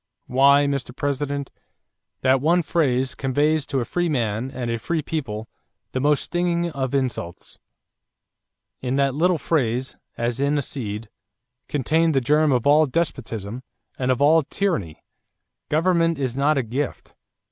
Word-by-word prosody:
Why, 140 +2 +5
Mr. 140 -3 -2
President, 140 0 -2 0.7
that 130 0 +3
one 170 +4 +3
phrase 135 -5 +1
conveys 145 +3 +1
to 135 -3 0
a - - -2
free 175 +5 -1
man 120 -3 -1
and 125 -3 -4
a 115 - -2
free 155 +8 -2
people 115 -9 -4 0.4
the 130 - -2
most 145 +1 +2
stinging 175 -1 0
of 135 -2 -2
insults. 125 -10 -3 1.2
In 130 0 -2
that 140 -1 +2
little 175 +4 +2
phrase, 130 -5 -1 0.2
as 120 +1 -1
in 140 +1 +1
a 145 - 0
seed, 110 -5 -5
is - - -27 0.6
contained 155 +3 +1
the - - +5
germ 150 +4 +3
of 125 -3 +1
all 150 +2 +5
despotism 120 - -3 0.4
and 130 -1 0
of 130 +2 +2
all 160 +3 +6
tyranny. 135 - -2 0.7
Government 165 +1 +2
is 130 -3 -2
not 140 +2 +2
a 135 - +1
gift. 130 +5 -4
140 Hz, 150 wpm, -23 LUFS, 125-155 Hz, 1.2 s, all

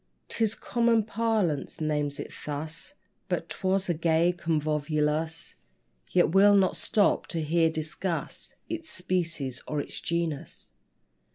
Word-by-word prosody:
'Tis 220 -1 +1
common 235 -2 +2
parlance 215 -9 0
names 150 -2 -1
it - - -6 0.2
thus; 155 - -4 0.3
But - - -1
'twas 190 +1 0
a 175 - +2
gay 165 +2 +3
convolvulus: 155 -1 0 0.6
Yet 175 -1 +4
we'll 200 +2 +7
not 190 -2 +4
stop 205 -2 +2
to 165 - -1
here 165 +2 +3
discuss 160 +3 -3
Its 330 -1 -5
species 170 -8 -2
or 150 - -1
its - - -4
genus. 170 -4 -3
170 Hz, 120 wpm, -28 LUFS, 155-195 Hz, 0.6 s, we'll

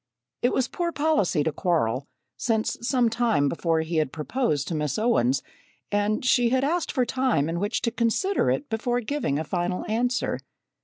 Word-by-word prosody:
It 245 - +3
was 260 -1 +1
poor 345 +3 -2
policy 290 - +1
to 160 - 0
quarrel, 140 - 0 0.3
since 220 -2 0
some 245 0 +2
time 230 -11 +2
before 165 +1 0
he 160 +1 -2
had 155 -4 +1
proposed 155 - -1
to - - -2
Miss 150 -3 -1
Owens, 140 - +2 0.5
and 205 +3 0
she 245 -2 +4
had 260 +2 +2
asked 330 +4 0
for 255 -3 +1
time 255 - +1
in 165 +1 -2
which 205 +4 -1
to 235 - +1
consider 240 - +1
it 290 - -1
before 240 +2 -1
giving 245 - -1
a 155 - -1
final 175 +2 -2
answer. 245 +3 0
220 Hz, 175 wpm, -25 LUFS, 160-250 Hz, 0.5 s, she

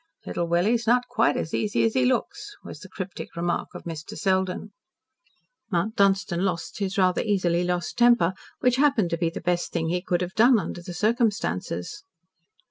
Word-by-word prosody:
"Little 170 - -2
Willie's 210 +8 +1
not 245 +2 +3
quite 145 - +2
as 160 - -4
easy 210 -1 +1
as 225 - +2
he 255 -1 +2
looks," 410 - -1
was - - -9
the - - -12
cryptic 190 -2 -7
remark 170 0 -2
of - - -8
Mr. 160 -2 -7
Selden. 190 -1 -1 1.0
Mount 195 +5 0
Dunstan 195 -2 +2
lost 175 -2 -3
his 200 +1 -2
rather 185 -2 +3
easily 180 -4 +1
lost 180 +3 -2
temper, 235 -7 +5 0.3
which 250 0 +3
happened 270 -11 +3
to 170 - 0
be 165 - +1
the 165 - -7
best 175 +1 -1
thing 160 -1 -1
he 180 +1 0
could 180 -1 -1
have 180 +1 -3
done 240 +2 +5
under 185 -3 -4
the 175 0 -8
circumstances. 210 - -1
190 Hz, 180 wpm, -25 LUFS, 175-225 Hz, 1.0 s, temper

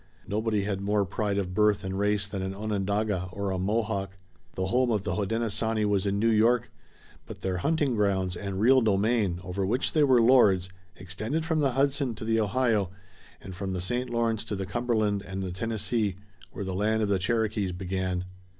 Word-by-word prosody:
Nobody 105 0 0
had 100 -1 -2
more 100 0 +1
pride 100 +1 -2
of 90 -2 -2
birth 105 0 +3
and 95 +1 -3
race 105 0 +1
than 100 -1 -4
an 95 +1 -4
Onondaga 100 -2 -1
or 100 0 -2
a 95 - -2
Mohawk. 100 -1 -1 0.4
The 95 - -1
home 125 +2 +2
of 105 -4 0
the - - -2
Hodenosaunee 110 +1 0
was 100 -1 +1
in 100 0 0
New 115 +3 +3
York, 115 +2 +3 0.6
but - - -9
their 95 -1 -1
hunting 145 - +1
grounds 95 -3 +1
and 100 0 -4
real 130 +5 +5
domain, 105 -3 +1
over 95 +2 -3
which 115 +8 0
they 155 - +3
were 130 -4 +5
lords, 105 -7 +5 0.3
extended 110 - -4
from 160 -1 0
the 140 -4 +2
Hudson 135 -2 +1
to 110 - -7
the 115 0 +2
Ohio 110 -3 +1 0.5
and 95 +2 -8
from 95 +1 -4
the 90 - -2
St. 120 +7 -2
Lawrence 115 -2 0
to 105 - -3
the 95 0 -3
Cumberland 110 -1 0
and 95 -1 -5
the 90 - -4
Tennessee, 105 0 -1 0.4
where 100 - -5
the 95 - -3
land 110 +3 +1
of 105 - 0
the 100 -2 +2
Cherokees 105 -1 0
began. 90 0 -2
105 Hz, 195 wpm, -27 LUFS, 95-115 Hz, 0.6 s, real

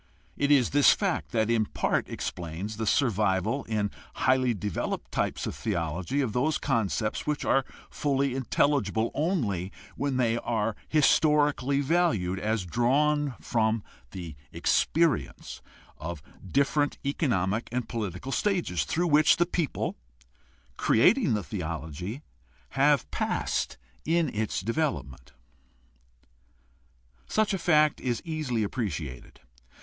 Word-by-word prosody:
It 140 - 0
is 140 -5 +4
this 145 -2 +6
fact - - -1
that 110 -1 +1
in 110 -2 +2
part - - -1
explains 90 +5 -5
the 110 -1 -2
survival 110 0 +1
in 105 -2 -1 0.2
highly 130 -2 +2
developed 100 -3 -3
types - - -1
of - - -3
theology 95 - -2
of 120 -6 -2
those 140 +5 +1
concepts 110 -4 -1
which 150 -1 -1
are 135 - +3 0.3
fully 140 -2 0
intelligible 125 -4 +1
only 115 - -1 0.2
when 140 -2 -1
they 115 -2 +2
are 115 -2 -1
historically 145 -2 +3
valued 130 - +1
as 110 -2 -1
drawn 140 - +1
from 110 +5 0 0.3
the 85 -5 -7 0.2
experience 165 -6 0 0.4
of 80 -2 -6 0.2
different 140 +7 +1
economic 115 - 0
and 125 -2 -2
political 110 +1 -4
stages 170 - 0
through 170 - 0
which 155 -2 +5
the 175 - +3
people 170 -4 -2 0.8
creating 135 - +4
the 105 - -2
theology 85 - -5 0.5
have 140 -2 +3
passed - - -1 0.3
in 165 -2 +1
its 110 0 -1
development. 105 - -3 1.9
Such 215 -1 +1
a 195 - -1
fact 155 -3 +3
is 120 -3 -2
easily 150 -9 -1
appreciated. 80 - -5
120 Hz, 115 wpm, -28 LUFS, 100-145 Hz, 1.9 s, this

